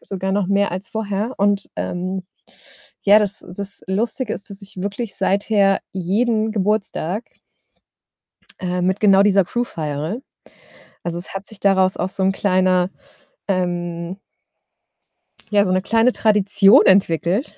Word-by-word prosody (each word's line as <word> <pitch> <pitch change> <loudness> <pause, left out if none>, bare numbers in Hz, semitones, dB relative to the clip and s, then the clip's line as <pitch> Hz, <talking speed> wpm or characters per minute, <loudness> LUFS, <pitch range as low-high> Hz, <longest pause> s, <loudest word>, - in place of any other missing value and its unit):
sogar 190 0 -4
noch 200 -1 0
mehr 200 0 +1
als 185 +2 -4
vorher 220 +2 -3
und 200 0 +1
ähm, 185 +2 -3 0.8
ja, 205 +1 +6
das 210 -1 -1
das 200 +3 -6
Lustige 220 +4 -1
ist, 205 - -5
dass 200 0 -6
ich 195 -1 -12
wirklich 200 +3 -4
seither 200 0 +2
jeden 215 +4 0
Geburtstag 205 -1 -1 1.4
äh, 180 0 -2
mit 185 +2 0
genau 195 -2 +5
dieser 200 -2 +4
Crew 240 +7 -1
feiere. 155 - -4 0.8
Also, 170 0 -4
es 175 - -9
hat 195 +1 -5
sich 215 -2 -9
daraus 190 -1 +3
auch 185 - -2
so 195 0 -3
'n 190 0 +3
kleiner, 185 -2 +2 0.6
ähm 175 -1 -2 1.3
ja, 205 -1 +4
so 185 - -1
'ne 185 0 +2
kleine 225 +5 +3
Tradition 210 +1 +4
entwickelt, 190 - +2
195 Hz, 135 wpm, -20 LUFS, 185-210 Hz, 1.4 s, ja